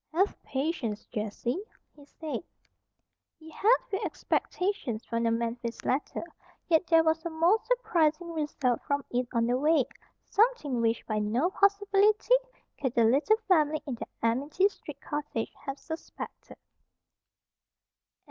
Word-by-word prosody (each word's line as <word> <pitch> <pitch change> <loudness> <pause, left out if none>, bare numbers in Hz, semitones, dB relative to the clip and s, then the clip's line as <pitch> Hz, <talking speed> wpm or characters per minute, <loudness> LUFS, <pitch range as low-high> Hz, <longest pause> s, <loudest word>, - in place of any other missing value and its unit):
"Have 385 +4 +2
patience, 265 -7 -2
Jessie," 235 - -3 0.3
he 290 -1 -16
said. 300 -1 -5 0.9
He 320 0 -13
had 440 +9 +4
few 390 - 0
expectations 360 - -2
from 230 0 -2
the 230 - +2
Memphis 235 +1 -3
letter; 270 +3 -1 0.4
yet 335 +1 +3
there 330 -1 +5
was 320 0 +1
a 340 - -2
most 340 +8 +2
surprising 340 -9 +1
result 295 -6 0
from 285 -2 -1
it 245 0 0
on 230 -1 +2
the 245 +2 +1
way, 300 -2 +4 0.4
something 405 - +2
which 230 0 +1
by 215 -1 -1
no 235 - +1
possibility 405 +3 +3 0.5
could 260 -3 -1
the 235 - +5
little 285 - +4
family 310 -4 +3
in 275 - -3
the 235 - -6 0.2
Amity 285 - +2
Street - - -11
cottage 295 -6 -3
have 275 0 -3
suspected. 320 +2 -8
300 Hz, 135 wpm, -29 LUFS, 240-355 Hz, 0.9 s, there